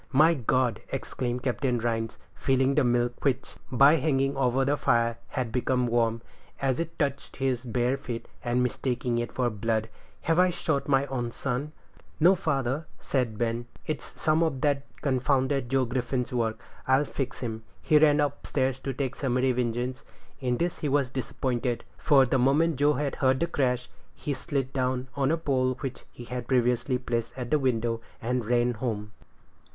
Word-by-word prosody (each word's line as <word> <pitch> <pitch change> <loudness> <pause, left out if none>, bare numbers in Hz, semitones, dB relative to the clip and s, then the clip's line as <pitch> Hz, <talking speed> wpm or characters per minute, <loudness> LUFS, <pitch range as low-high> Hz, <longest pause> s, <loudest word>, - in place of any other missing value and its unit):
"My 155 +5 +6
God!" 130 -3 +1
exclaimed 125 0 -3
Captain 125 -1 0
Rhines, 115 -1 -2 0.2
feeling 135 0 +2
the 150 - +3
milk, 120 0 +1
which, 135 -2 -1
by 140 +5 +6
hanging 135 -2 +1
over 135 0 +2
the 145 +2 +2
fire, 115 -4 +1
had 125 -5 -3
become 125 +1 +1
warm, 115 -1 +1 0.4
as 135 -2 0
it 165 0 -4
touched 140 -2 -2
his 130 -2 -1
bare 125 +2 +1
feet, 120 -4 -6 0.2
and 120 +1 +1
mistaking 125 -1 -1
it 120 - -3
for 125 -2 0
blood; 110 +1 -1 0.3
"have 165 +1 +2
I 185 0 +5
shot 155 -4 -1
my 135 -1 +3
own 125 -4 -2
son?" 135 +4 -3 0.5
"No, 175 +4 +7
father," 140 -3 -1
said 125 -6 -1
Ben; 120 +1 -1 0.2
"it's 155 -2 -5
some 155 +1 +2
of 155 -6 0
that 145 -1 +1 0.2
confounded 135 -1 +1
Joe 135 0 +2
Griffin's 125 +1 -2
work. 115 -2 0 0.3
I'll 135 +2 +4
fix 135 -2 -4
him." 110 -3 -4 0.2
He 150 - +5
ran 150 -1 +5
up 145 -1 -1
stairs 130 -2 0
to 135 - -3
take 135 -1 -2
summary 130 -1 +1
vengeance. 125 +1 -2 0.4
In 125 -2 0
this 175 +4 -1
he 150 - -1
was 140 -2 +1
disappointed, 125 -2 -2 0.2
for 140 -4 +5
the 130 +1 +1
moment 145 +5 +3
Joe 145 +2 +4
heard 135 -2 +1
the 170 - +2
crash, 125 -6 0 0.3
he 145 - -3
slid 135 0 -3
down 130 -1 -1
on 135 -1 +1
a 165 - +2
pole, 130 -5 +1
which 135 -3 -5
he 120 - -10
had 125 0 -5
previously 125 0 +2
placed 120 -1 -3
at 125 0 -5
the 150 - +4
window, 115 -3 0 0.2
and 125 +1 -1
ran 120 +1 +2
home. 105 -3 -3
130 Hz, 175 wpm, -27 LUFS, 120-140 Hz, 0.5 s, No